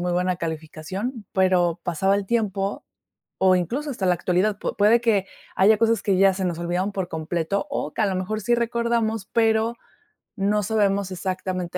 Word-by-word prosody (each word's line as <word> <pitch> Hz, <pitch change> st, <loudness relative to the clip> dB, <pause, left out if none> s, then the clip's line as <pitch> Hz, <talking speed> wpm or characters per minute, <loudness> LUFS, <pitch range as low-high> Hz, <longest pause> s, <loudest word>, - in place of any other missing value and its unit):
muy 180 Hz, 0 st, -1 dB
buena 180 Hz, +1 st, 0 dB
calificación, 170 Hz, -, -5 dB
pero 180 Hz, -3 st, +2 dB
pasaba 190 Hz, +4 st, +1 dB
el 200 Hz, -, -2 dB
tiempo, 200 Hz, -3 st, -1 dB, 0.5 s
o 190 Hz, -1 st, +4 dB
incluso 250 Hz, -, -2 dB
hasta 210 Hz, -8 st, -2 dB
la 180 Hz, -, +4 dB
actualidad, 185 Hz, +4 st, 0 dB
pu -, -, -4 dB
puede 215 Hz, +3 st, +5 dB
que 215 Hz, -5 st, +1 dB, 0.3 s
haya 210 Hz, +3 st, +5 dB
cosas 230 Hz, -2 st, +2 dB
que 195 Hz, -2 st, +1 dB
ya 195 Hz, 0 st, +5 dB
se 190 Hz, 0 st, -3 dB
nos 175 Hz, -2 st, -2 dB
olvidaron 180 Hz, +4 st, -1 dB
por 190 Hz, -2 st, -3 dB
completo, 165 Hz, +4 st, -2 dB
o 150 Hz, -, -3 dB
que -, -, 0 dB
a -, -, +3 dB
lo 195 Hz, -, -1 dB
mejor 215 Hz, +4 st, -3 dB
sí 240 Hz, +3 st, +2 dB
recordamos, 235 Hz, -3 st, -1 dB
pero, 225 Hz, 0 st, +2 dB, 0.6 s
no 205 Hz, +1 st, +1 dB
sabemos 200 Hz, -2 st, +1 dB
exactamente 185 Hz, -1 st, -3 dB
195 Hz, 180 wpm, -23 LUFS, 180-220 Hz, 0.6 s, puede